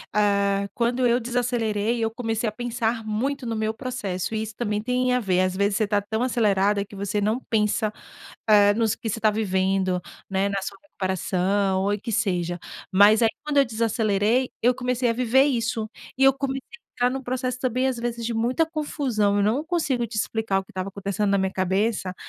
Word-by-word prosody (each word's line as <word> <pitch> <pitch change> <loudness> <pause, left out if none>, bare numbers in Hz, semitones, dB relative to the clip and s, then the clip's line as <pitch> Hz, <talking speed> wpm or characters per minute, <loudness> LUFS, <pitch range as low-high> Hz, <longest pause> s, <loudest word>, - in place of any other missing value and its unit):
eh, 200 -1 +2
quando 245 +2 +1
eu 240 +1 +3
desacelerei 235 -2 -1
eu 225 - 0
comecei 225 -1 -2
a - - -7
pensar 230 0 -2
muito 255 +6 -2
no 230 -1 -2
meu 220 0 -1
processo 220 -7 -4
e 215 - -1
isso 220 0 -6
também 210 -3 -1
tem 250 +2 +1
a 250 - +3
ver. 185 -5 +1
Às 185 0 0
vezes 200 +1 +1
você 220 - +2
está 205 0 +1
tão 220 +3 -2
acelerada 205 -4 +2
que 205 - -13
você 200 +1 -2
não 215 +4 +1
pensa, 215 0 +1 0.5
eh, 205 -1 +6
nos 225 -2 +1
que 225 - -5
você 225 - -2
está 215 - +4
vivendo, 190 -3 0 0.3
né, 195 0 +1
na 200 -1 -2
sua 195 +1 -6
recuperação 190 - 0
ou 200 +1 +1
em 205 - -2
que 230 +3 -5
seja. 180 -6 0 0.3
Mas 205 +3 +6
aí 225 - +5
quando 295 -1 -1
eu 280 - +6
desacelerei, 225 +1 +1
eu 245 +2 +4
comecei 250 -1 0
a - - +2
viver 250 +2 +3
isso 230 -4 -1 0.3
e 270 - +2
eu 270 0 +7
comecei 270 0 -3 0.3
entrar 245 0 +2
num 265 +1 -4
processo 255 0 -2
também, 255 0 0
às 260 -2 -1
vezes, 235 0 -3
de 235 - -2
muita 245 +8 +1
confusão. 265 -10 0
Eu 200 - +2
não 240 +9 +1
consigo 300 -8 0
te 230 0 -9
explicar 215 -2 0
o - - -6
que - - -38
estava 185 +1 -4
acontecendo 200 +1 -2
na 200 - +3
minha 190 0 0
cabeça, 190 +1 0
220 Hz, 205 wpm, -24 LUFS, 200-245 Hz, 0.5 s, eu